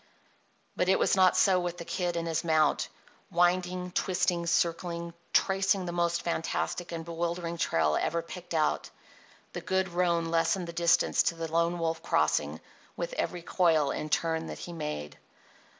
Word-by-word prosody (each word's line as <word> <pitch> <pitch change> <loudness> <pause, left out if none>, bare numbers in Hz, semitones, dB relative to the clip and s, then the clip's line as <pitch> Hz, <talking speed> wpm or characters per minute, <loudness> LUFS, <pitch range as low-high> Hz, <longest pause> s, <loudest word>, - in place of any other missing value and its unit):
But 180 - +1
it 190 - +5
was - - +2
not 185 -1 +5
so 190 -2 +4
with 175 -1 -3
the 170 - -7
Kid 175 -1 -2
and 170 0 -2
his 165 0 -1
mount. 155 -3 +2 0.4
Winding, 180 0 +1
twisting, 175 -2 0
circling, 170 0 0 0.2
tracing 195 -1 +2
the 175 - -3
most 170 0 0
fantastic 170 +1 -2
and 165 -1 -5
bewildering 170 0 -3
trail 80 - +2
ever 170 +1 0
picked 175 0 -7
out, 155 -1 +1 0.6
the - - -5
good 190 0 0
roan 170 -1 +1
lessened 170 +2 +1
the 170 - -7
distance 170 0 +3
to 170 - 0
the 165 -1 -5
Lone 170 +1 +1
Wolf 165 -1 -2
Crossing - - +1 0.4
with - - -3
every 180 - -3
coil 165 -6 +2
and 155 - -4
turn 160 0 0
that - - -6
he 175 - -7
made. 150 - -5
170 Hz, 165 wpm, -29 LUFS, 165-180 Hz, 0.6 s, it